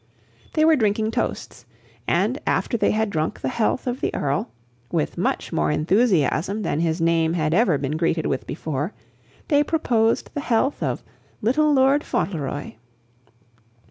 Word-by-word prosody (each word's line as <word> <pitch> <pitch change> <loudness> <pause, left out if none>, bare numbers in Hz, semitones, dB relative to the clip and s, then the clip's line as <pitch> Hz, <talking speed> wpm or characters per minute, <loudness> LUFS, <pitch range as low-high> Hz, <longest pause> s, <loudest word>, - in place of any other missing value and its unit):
They 310 0 +3
were 320 0 +6
drinking 220 -3 +1
toasts; - - -4 0.4
and, - - +1
after - - 0
they 230 - +2
had 220 -1 0
drunk 155 -2 -2
the 130 - -1
health 230 - 0
of 250 0 -3
the - - 0
Earl, 140 -2 -1 0.4
with 75 - -1
much - - -2
more 75 0 +1
enthusiasm 185 - +1
than 150 - -1
his 165 0 0
name 165 0 +2
had 155 -2 0
ever 185 -6 +3
been 140 +2 -2
greeted 165 -1 0
with 130 - -2
before, 150 +3 -3 0.6
they 290 -2 +4
proposed 235 -8 +1
the 290 - -3
health 260 +3 0
of - - -2 0.4
"Little 300 +7 +3
Lord 275 +1 +4
Fauntleroy." 145 -6 -3
195 Hz, 150 wpm, -23 LUFS, 155-245 Hz, 0.6 s, were